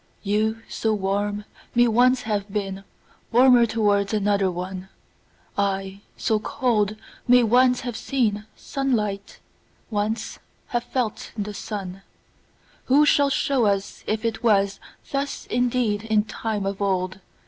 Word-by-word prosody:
You, 220 +2 0
so 220 -1 -1
warm, 205 +1 -1 0.3
may 240 0 +5
once 250 +2 +3
have 210 -2 -2
beenWarmer 215 +5 +1
towards 205 -2 +1
another 200 -2 +2
one:I, 190 +1 -5 0.2
so 220 -1 +1
cold, 215 -3 0 0.3
may 250 0 +6
once 250 +2 +4
have 245 -1 -4
seenSunlight, 215 -2 -2 0.5
once 210 +2 -2 0.3
have 240 -1 -1
felt 245 -4 -3
the 210 0 -3
sun:Who 205 +8 -3
shall 285 -1 +4
show 265 -4 +1
us 200 -1 -2
if 220 +1 -1
it 225 -1 -1
wasThus 220 +6 -1
indeed 240 -3 +1
in 215 -1 +2
time 215 -1 -3
of 195 +1 -3
old? 185 -1 -1
215 Hz, 110 wpm, -24 LUFS, 200-240 Hz, 0.5 s, may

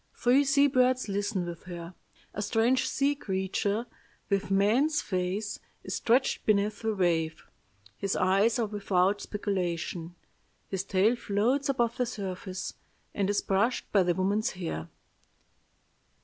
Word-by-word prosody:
Three 255 +4 +4
sea 280 +1 +4
birds 255 -2 +2
listen 200 -2 -1
with 170 0 -8
her. 175 -1 -7 0.4
A 205 - -3
strange 230 +5 +2
sea 280 +1 +2
creature, 200 -1 -1 0.5
with 200 0 +1
man's 225 +11 +3
face, 190 +3 -2 0.2
is - - -5
stretched 255 +3 +2
beneath 210 0 +1
the 220 -1 -1
wave. 165 -4 0 0.5
His 195 - -1
eyes 195 +5 +3
are 235 - +1
without 200 -1 +1
speculation. 175 -4 -3 0.5
His 190 -1 -3
tail 200 +4 +2
floats 245 +6 0
above 240 -4 +1
the 250 - 0
surface, 190 -3 -5 0.4
and 200 -1 0
is 205 - +1
brushed 200 +6 0
by 200 - +5
the 175 -1 +1
woman's 205 +5 0
hair. 160 - -5
205 Hz, 135 wpm, -29 LUFS, 185-235 Hz, 0.5 s, by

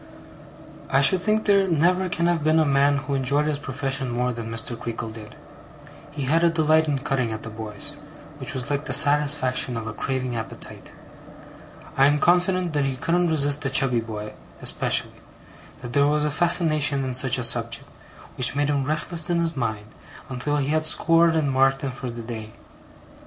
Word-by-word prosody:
I 135 - +3
should 170 +6 +3
think 215 +2 0
there 200 -2 +3
never 180 +3 +1
can 170 0 -1
have 170 -3 +1
been 155 +1 +3
a 160 - +3
man 140 0 +2
who 140 0 -4
enjoyed 140 +2 0
his 150 -2 -2
profession 135 -1 -3
more 125 +1 -1
than 115 -1 -7
Mr. 115 +1 -2
Creakle 115 -1 -6
did. 110 -1 -11 0.7
He 145 -1 -6
had 160 +6 +1
a 170 - +5
delight 160 -1 +2
in 145 -2 0
cutting 135 -4 -2
at 110 - -6
the 115 - -7
boys, 110 +7 -4 0.4
which 135 +2 -3
was 130 +2 -3
like 145 +1 -2
the 130 - -3
satisfaction 140 -4 +2
of 115 - -5
a 115 - -5
craving 130 +1 -3
appetite. 110 -1 -7 1.0
I 135 0 +5
am 145 +1 +2
confident 180 +1 +1
that 145 -2 0
he 135 -1 -2
couldn't 170 +6 0
resist 145 -1 +1
a - - +1
chubby 130 -2 +2
boy, 105 -2 -7 0.3
especially; - - -1 0.6
that 120 0 -7
there 140 0 +3
was 150 0 +1
a 150 - -1
fascination 155 -3 +2
in 130 -1 -3
such 130 0 +2
a 125 - -3
subject, 115 0 0 0.5
which 125 +1 +4
made 145 0 0
him 140 -2 0
restless 155 +3 0
in 175 - +1
his 165 -1 -1
mind, 110 -5 -3 0.4
until 135 +3 -2
he 140 -1 -1
had 155 +1 +1
scored 165 +1 +3
and 150 -4 0
marked 135 +1 +2
him 135 - -2
for 125 0 -7
the 120 0 -7
day. 110 -2 -8
140 Hz, 190 wpm, -23 LUFS, 125-155 Hz, 1.0 s, a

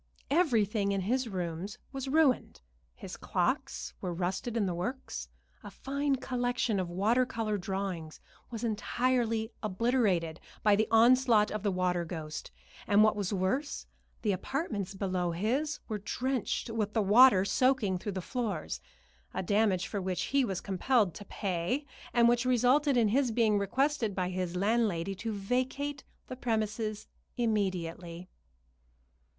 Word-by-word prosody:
Everything 220 - +2
in 195 -1 0
his 250 +6 0
rooms 180 +1 -4
was 270 -1 -5
ruined 285 -2 +2 0.4
his - - -8
clocks 60 +1 -2
were 180 - -2
rusted 185 +7 -2
in 215 - +2
the 180 - -1
works; 245 +10 -4 0.3
a - - -7
fine 280 +1 -1
collection 245 -4 -1
of 180 -2 -2
water 210 +8 +2
color 225 -3 -2
drawings 190 -4 -4 0.3
was 230 -1 -6
entirely 230 0 0
obliterated 200 -6 +1 0.2
by 210 -1 +5
the 215 +1 +1
onslaught 230 -1 +5
of 215 - -3
the 205 - +1
water 180 -2 0
ghost; 160 -2 -6 0.4
and 205 +1 +6
what 215 -1 +4
was 205 -2 -2
worse, 200 +10 -1 0.4
the 210 - +2
apartments 200 - -3
below 185 -3 -1
his 265 - 0
were 215 -2 -3
drenched 250 +2 -2
with 215 -2 -2
the 225 - +2
water 205 -1 +7
soaking 215 -3 +2
through 205 +2 -4
the 185 - -3
floors, 200 - -3 0.5
a - - -1
damage 200 -1 +2
for 200 - -3
which 180 -2 -2
he 275 -1 +4
was 190 -6 -2
compelled 200 0 +1
to 205 - -9
pay, 195 - -2 0.3
and 235 -1 +5
which 240 0 +3
resulted 255 +3 +3
in 225 -3 +4
his 260 +3 +2
being 220 -2 +2
requested 235 +1 0
by 185 -1 -1
his 180 -1 -3
landlady 200 -3 +1
to 220 +4 -4
vacate 255 +7 -2 0.2
the 255 - -7
premises 215 -3 -2 0.3
immediately. 185 -6 -2
215 Hz, 145 wpm, -30 LUFS, 185-245 Hz, 0.5 s, water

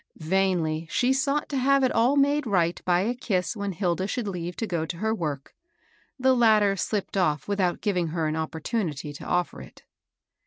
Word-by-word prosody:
Vainly 165 -2 0
she 250 +7 +2
sought 280 +2 0
to 280 - -2
have 275 +1 +3
it 255 - +3
all 240 +5 +3
made 285 0 +2
right 175 -4 +1
by 180 0 +3
a 225 +5 0
kiss 200 -5 -2
when 200 -2 -3
Hilda 185 0 -1
should 235 0 -3
leave 175 -2 -4
to 225 - -2
go 170 -6 -2
to 165 +1 -5
her 220 +4 0
work; 150 -9 -4 0.6
the 260 0 +3
latter 215 -4 +4
slipped 200 +2 -2
off 155 -6 +1
without 195 -3 0
giving 180 -5 0
her 160 0 -2
an 155 0 -1
opportunity 160 - -3
to 145 - -10
offer 175 - -1
it. 65 - -14
190 Hz, 190 wpm, -26 LUFS, 165-230 Hz, 0.6 s, latter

